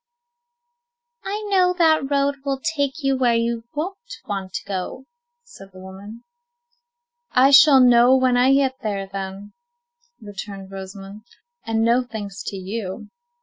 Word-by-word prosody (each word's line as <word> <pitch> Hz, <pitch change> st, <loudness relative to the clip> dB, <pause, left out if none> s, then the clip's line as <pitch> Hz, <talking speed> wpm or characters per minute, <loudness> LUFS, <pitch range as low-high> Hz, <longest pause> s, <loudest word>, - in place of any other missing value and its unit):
"I 420 Hz, +2 st, -4 dB
know 365 Hz, -2 st, +3 dB
that 315 Hz, -5 st, +2 dB
road 280 Hz, 0 st, +1 dB
will 275 Hz, -1 st, -2 dB
take 290 Hz, -1 st, -2 dB
you 275 Hz, 0 st, +2 dB
where 245 Hz, -3 st, +2 dB
you 230 Hz, 0 st, -1 dB
won't 385 Hz, +10 st, -6 dB
want 195 Hz, -2 st, -5 dB
to -, -, -5 dB
go," 195 Hz, +7 st, -5 dB, 0.4 s
said 195 Hz, -, -15 dB
the -, -, -14 dB
woman. 195 Hz, +4 st, -11 dB, 1.1 s
"I 265 Hz, +1 st, +5 dB
shall 275 Hz, 0 st, +8 dB
know 245 Hz, 0 st, +6 dB
when 255 Hz, -1 st, +2 dB
I 250 Hz, +2 st, +4 dB
get 270 Hz, -1 st, +1 dB
there, 200 Hz, -3 st, -3 dB
then," 195 Hz, +1 st, -7 dB, 0.7 s
returned 200 Hz, -2 st, -9 dB
Rosamond, 195 Hz, +2 st, -10 dB, 0.4 s
"and 225 Hz, 0 st, 0 dB
no 235 Hz, +2 st, +3 dB
thanks 205 Hz, -5 st, -7 dB
to -, -, -4 dB
you." 195 Hz, +2 st, -6 dB
235 Hz, 140 wpm, -21 LUFS, 200-275 Hz, 1.1 s, shall